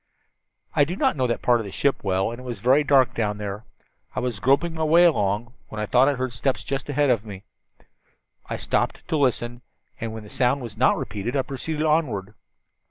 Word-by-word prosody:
"I 145 Hz, -, +5 dB
do 165 Hz, +6 st, -2 dB
not 265 Hz, +6 st, +1 dB
know 130 Hz, -3 st, +1 dB
that 120 Hz, -, -2 dB
part 120 Hz, -1 st, +4 dB
of -, -, -3 dB
the 100 Hz, -, -7 dB
ship 140 Hz, +6 st, 0 dB
well, 95 Hz, +2 st, 0 dB
and 120 Hz, -, -7 dB
it -, -, -10 dB
was 125 Hz, -2 st, -6 dB
very 130 Hz, +5 st, +4 dB
dark 135 Hz, -3 st, +4 dB
down 105 Hz, -2 st, -1 dB
there. 105 Hz, +1 st, -5 dB, 0.5 s
I -, -, 0 dB
was 125 Hz, -4 st, -3 dB
groping 140 Hz, -, +2 dB
my 160 Hz, -1 st, -2 dB
way 165 Hz, +3 st, +5 dB
along 115 Hz, -, +1 dB
when 110 Hz, -, -7 dB
I 105 Hz, -, -1 dB
thought 125 Hz, +5 st, +4 dB
I 145 Hz, -, 0 dB
heard 130 Hz, -1 st, -3 dB
steps 130 Hz, +3 st, -1 dB
just 135 Hz, +1 st, -4 dB
ahead 145 Hz, -1 st, +2 dB
of 115 Hz, -4 st, +1 dB
me. 100 Hz, -3 st, -9 dB, 1.1 s
I -, -, -2 dB
stopped -, -, -1 dB
to -, -, +1 dB
listen, 120 Hz, -3 st, 0 dB, 0.4 s
and 115 Hz, -1 st, -4 dB
when 110 Hz, -1 st, -7 dB
the 105 Hz, -, -12 dB
sound 130 Hz, +3 st, +1 dB
was 115 Hz, -4 st, -7 dB
not 125 Hz, +4 st, +3 dB
repeated 110 Hz, +4 st, -4 dB
I 135 Hz, -, +1 dB
proceeded 150 Hz, +4 st, -4 dB
onward. 120 Hz, -11 st, 0 dB
125 Hz, 220 wpm, -24 LUFS, 110-140 Hz, 1.1 s, I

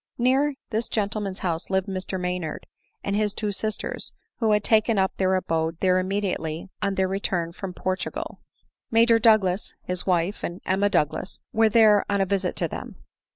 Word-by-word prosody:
Near 270 Hz, +4 st, +2 dB, 0.2 s
this 225 Hz, +1 st, -1 dB
gentleman's 205 Hz, -2 st, -2 dB
house 165 Hz, -1 st, -2 dB
lived 190 Hz, -1 st, +1 dB
Mr 190 Hz, 0 st, -3 dB
Maynard 180 Hz, -3 st, -3 dB, 0.4 s
and 200 Hz, -, -1 dB
his 210 Hz, -1 st, 0 dB
two 210 Hz, -2 st, -1 dB
sisters, 215 Hz, +2 st, -4 dB, 0.2 s
who 225 Hz, -3 st, +2 dB
had 210 Hz, -1 st, +3 dB
taken 220 Hz, 0 st, +3 dB
up 190 Hz, 0 st, +1 dB
their 190 Hz, 0 st, +2 dB
abode 165 Hz, -2 st, -1 dB
there 185 Hz, -1 st, +3 dB
immedi 195 Hz, 0 st, 0 dB
ately 160 Hz, +3 st, -5 dB
on 200 Hz, -, 0 dB
their 190 Hz, 0 st, +2 dB
return 185 Hz, -3 st, -1 dB
from 185 Hz, +2 st, -6 dB
Portugal. 185 Hz, 0 st, -3 dB, 0.5 s
Major 230 Hz, 0 st, +5 dB
Douglas, 215 Hz, -4 st, +3 dB
his 180 Hz, +1 st, -3 dB
wife, 180 Hz, +2 st, +1 dB
and 175 Hz, +2 st, -4 dB
Emma 195 Hz, +2 st, +2 dB
Douglas 155 Hz, +2 st, -1 dB
were 225 Hz, 0 st, +4 dB
then 215 Hz, -2 st, +6 dB
on 200 Hz, 0 st, +1 dB
a 195 Hz, -, +3 dB
visit 190 Hz, -1 st, -1 dB
to -, -, 0 dB
them. -, -, -7 dB
195 Hz, 175 wpm, -25 LUFS, 185-215 Hz, 0.5 s, then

